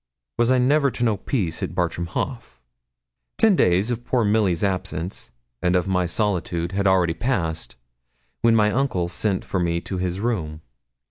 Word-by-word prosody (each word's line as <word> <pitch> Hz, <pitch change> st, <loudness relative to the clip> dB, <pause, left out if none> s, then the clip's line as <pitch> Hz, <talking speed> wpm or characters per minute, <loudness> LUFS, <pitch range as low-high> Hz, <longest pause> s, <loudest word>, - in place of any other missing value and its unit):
Was 120 Hz, 0 st, +3 dB
I 130 Hz, -, +4 dB
never 140 Hz, +3 st, +3 dB
to 120 Hz, -, -4 dB
know 110 Hz, -3 st, +2 dB
peace 95 Hz, -, -2 dB
at -, -, -4 dB
Bartram 85 Hz, 0 st, -1 dB
Haugh? 125 Hz, +8 st, -3 dB, 1.0 s
Ten 220 Hz, -3 st, +5 dB
days 95 Hz, -, +2 dB
of 120 Hz, 0 st, -3 dB
poor 120 Hz, -2 st, +1 dB
Milly's 100 Hz, -5 st, +2 dB
absence, 95 Hz, -4 st, -3 dB, 0.3 s
and 90 Hz, +1 st, +2 dB
of 90 Hz, +1 st, +1 dB
my 90 Hz, -2 st, +1 dB
solitude, 85 Hz, -3 st, -1 dB
had 100 Hz, 0 st, 0 dB
already 90 Hz, -3 st, +3 dB
passed, 85 Hz, -9 st, -2 dB, 0.7 s
when 115 Hz, -1 st, +4 dB
my 105 Hz, -1 st, +4 dB
uncle 110 Hz, -10 st, 0 dB
sent 95 Hz, +2 st, -1 dB
for 95 Hz, -, -2 dB
me 85 Hz, -1 st, 0 dB
to 95 Hz, 0 st, -5 dB
his 90 Hz, 0 st, -2 dB
room. 85 Hz, -9 st, -2 dB
95 Hz, 165 wpm, -23 LUFS, 85-115 Hz, 1.0 s, Ten